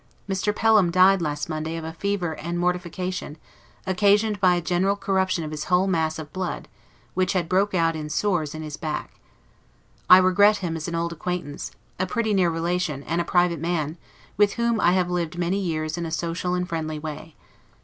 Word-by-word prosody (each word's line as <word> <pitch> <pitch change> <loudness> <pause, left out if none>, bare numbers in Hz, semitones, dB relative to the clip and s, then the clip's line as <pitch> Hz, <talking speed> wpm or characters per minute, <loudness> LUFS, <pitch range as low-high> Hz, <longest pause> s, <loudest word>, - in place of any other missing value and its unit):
Mr. 195 +1 0
Pelham 215 -5 +4
died 185 +2 +5
last 150 -2 -2
Monday 160 0 -3
of 165 - -6
a 160 0 -6
fever 185 -2 -2
and 170 +2 -4
mortification, 180 -2 -2 0.5
occasioned 205 +2 +2
by 185 -2 +4
a - - +1
general 180 +3 +1
corruption 190 -3 0
of 155 - -5
his 155 0 -4
whole 180 +1 +3
mass 160 -4 0
of 155 -2 -8
blood, 185 -1 -4 0.5
which 185 +1 +1
had 180 -3 0
broke 190 +3 +1
out 165 -2 +2
into 150 -1 -5
sores 155 -3 0
in 155 - -6
his 150 -1 -6
back. 155 -3 -4 1.0
I 185 - +11
regret 200 +3 +5
him 170 -4 -3
as 160 0 -5
an 170 - -3
old 170 0 -1
acquaintance, 170 -3 -4 0.3
a 185 - 0
pretty 220 +2 0
near 185 -3 +3
relation, 165 -3 -2
and 170 +3 -1
a - - -1
private 175 -2 +2
man, 165 -1 -2 0.4
with 205 -1 +4
whom 235 -1 0
I 175 - +4
have 180 -1 +1
lived 175 -1 -2
many 175 +3 0
years 160 -3 -2
in 170 - -3
a - - -6
social 170 +2 -2
and 180 0 -2
friendly 155 -2 -3
way. 155 +1 -7
175 Hz, 195 wpm, -24 LUFS, 160-185 Hz, 1.0 s, I